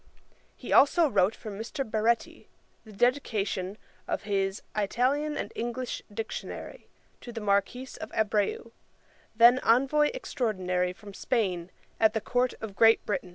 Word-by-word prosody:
He - - -5
also 325 +4 +6
wrote 200 -4 +2
for 215 - -8
Mr. 225 +6 -5
Baretti, 225 +2 0 0.4
the 220 - -12
dedication[dagger] 210 -5 0 0.3
of - - -2
his 195 -1 -1
Italian 260 +8 0
and - - -5
English 240 +2 -4
Dictionary 225 - -6 0.3
to 240 - -8
the 230 - -6
Marquis 210 +5 0
of - - -6
Abreu, 220 +1 0 0.6
then 240 +3 +7
Envoy 275 +6 +3
Extraordinary 185 - -1
from 200 +2 -12
Spain 185 -6 -1 0.3
at 220 0 +4
the - - +2
Court 250 +3 0
of 215 -3 -6
Great 225 +1 +5
Britain. 200 -3 -2
225 Hz, 135 wpm, -28 LUFS, 200-250 Hz, 0.6 s, then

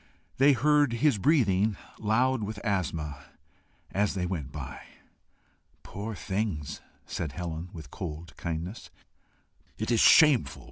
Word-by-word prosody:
They 140 +2 +7
heard 145 0 +3
his 125 -2 +2
breathing, 105 - +3 0.2
loud 120 +4 +2
with 105 0 -4
asthma, 80 -9 -2 0.7
as 100 0 0
they 90 -2 -1
went 80 -7 -4
by. 70 -4 -7 1.0
"Poor 105 +3 -6
things!" 95 -8 -3 0.2
said 75 -5 -4
Helen, 85 0 -5
with 80 -5 -10
cold 80 -2 -7
kindness. 85 +5 -5 0.9
"It 110 +2 -2
is 115 - +3
shameful!" 150 -1 +6
100 Hz, 120 wpm, -28 LUFS, 85-115 Hz, 1.0 s, They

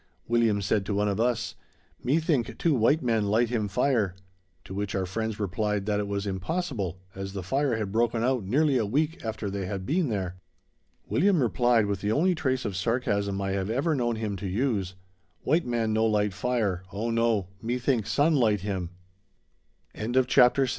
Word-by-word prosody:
William 115 -4 +2
said 100 +1 +1
to 100 - -1
one 105 +1 +1
of 100 0 -1
us: 120 -1 0 0.5
"Me 135 +6 +2
think 150 -8 0
two 165 - +2
white 135 +5 +3
man 115 -4 +1
light 115 +3 +2
him 110 -4 0
fire"; 110 -3 +1 0.5
to - - -8
which 100 0 -3
our 95 -1 0
friends 110 +3 -3
replied 105 0 -1
that 105 -1 0
it 105 - -2
was 100 0 -2
impossible, 100 - -3
as 95 0 -6
the 95 -2 -4
fire 135 +6 +1
had 105 -3 -3
broken 115 +1 +1
out 125 -3 +1
nearly 135 +6 +2
a 110 - +1
week 150 +8 0
after 110 -2 -3
they 100 -1 -3
had 95 -1 -4
been 160 - +1
there. 95 -4 -3 0.7
William 190 +1 +3
replied, 120 -2 +3
with 100 -2 -2
the 105 - 0
only 175 +10 +3
trace 130 -5 -1
of 100 - -3
sarcasm 100 -1 0
I 95 0 -1
have 95 0 -1
ever 140 +8 +1
known 120 -4 0
him 110 -2 -3
to 95 +1 -4
use: 100 -3 -1 0.5
"White 160 +1 +1
man 115 -2 0
no 110 +1 +3
light 105 -2 +1
fire, 105 -4 -1
oh 110 +4 -2
no, 115 -5 +1
me 120 +3 -1
think 125 -4 0
sun 150 +3 +3
light 110 - +3
him." 95 -3 -3 1.0
CHAPTER 115 +3 -4
VII. - - +7
_The 125 -1 +5
Wild 135 -2 +2
110 Hz, 195 wpm, -27 LUFS, 100-125 Hz, 1.0 s, VII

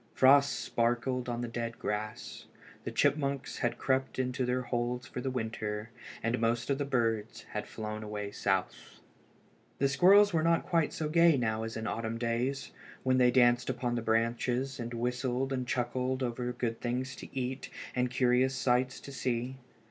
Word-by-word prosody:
Frost 140 +2 +6
sparkled 120 +2 0
on 120 0 -2
the 120 - -2
dead 115 0 -4
grass. 105 +1 -4 0.4
The - - -3
chipmunks 140 -1 0
had 120 0 0
crept 130 +1 0
into 125 -1 -1
their 125 +1 0
holes 120 0 -2
for 125 - -6
the 130 - -1
winter, 110 -3 -3 0.3
and 115 +2 0
most 115 +3 0
of 135 - 0
the 145 - 0
birds 115 -5 -1
had - - -4
flown 110 0 -5
away 105 -1 -5
south. 95 -2 -2 0.8
The 140 - +3
squirrels 190 +8 +6
were 160 - +3
not 165 +1 +2
quite 165 -4 +1
so 155 - -3
gay 165 -1 +5
now 110 -3 0
as 115 0 -4
in 110 - -4
the - - -1
autumn 115 0 -3
days, 120 +4 -1 0.3
when 130 0 +3
they 125 -1 +6
danced 120 -1 +4
upon 120 -1 -1
the 120 - -1
branches 120 +4 0
and 120 0 -4
whistled 125 +2 -1
and 130 -1 -2
chuckled 130 +2 -1
over 120 0 -2
the 125 - -2
good 120 -2 -3
things 130 +2 -2
to - - -8
eat 130 +2 -4 0.3
and 125 0 +2
the 125 - -11
curious 125 +1 +3
sights 130 0 +1
to 140 - -9
see. 125 0 -2
125 Hz, 180 wpm, -31 LUFS, 115-130 Hz, 0.8 s, Frost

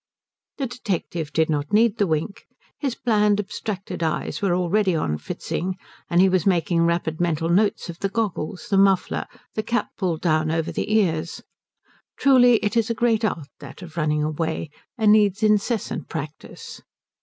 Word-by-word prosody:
The 275 - -1
detective 190 - -4
did 160 0 +2
not 145 -2 -2
need 225 +1 +3
the 205 - +3
wink. 160 +6 -3 0.3
His 270 -4 -2
bland, 210 -3 +2
abstracted 195 -2 -5
eyes 160 +4 -2
were 190 -3 +2
already 185 +1 +1
on 75 - -1
Fritzing, 180 - -4 0.3
and 175 - +3
he 190 - +6
was 185 -2 +2
making 170 -2 +2
rapid 170 -1 -1
mental 165 -1 0
notes 200 +4 +2
of 170 -1 -8
the 195 - -1
goggles, 195 -6 -3
the 195 - +3
muffler, 195 -1 +2 0.3
the 215 - -1
cap 235 +2 -1
pulled 175 -5 -1
down 155 -2 +1
over 165 0 -1
the - - -3
ears. 170 -6 0 0.7
Truly 250 -3 +6
it 205 - -1
is 230 -1 +2
a 230 - 0
great 230 -1 +1
art, 165 -9 -1
that 140 +6 -11
of 165 -3 -11
running 150 -2 0
away, 160 0 -2 0.3
and 215 -3 +4
needs 210 -1 +3
incessant 215 +1 0
practice. 155 -1 -8
185 Hz, 165 wpm, -23 LUFS, 160-210 Hz, 0.7 s, he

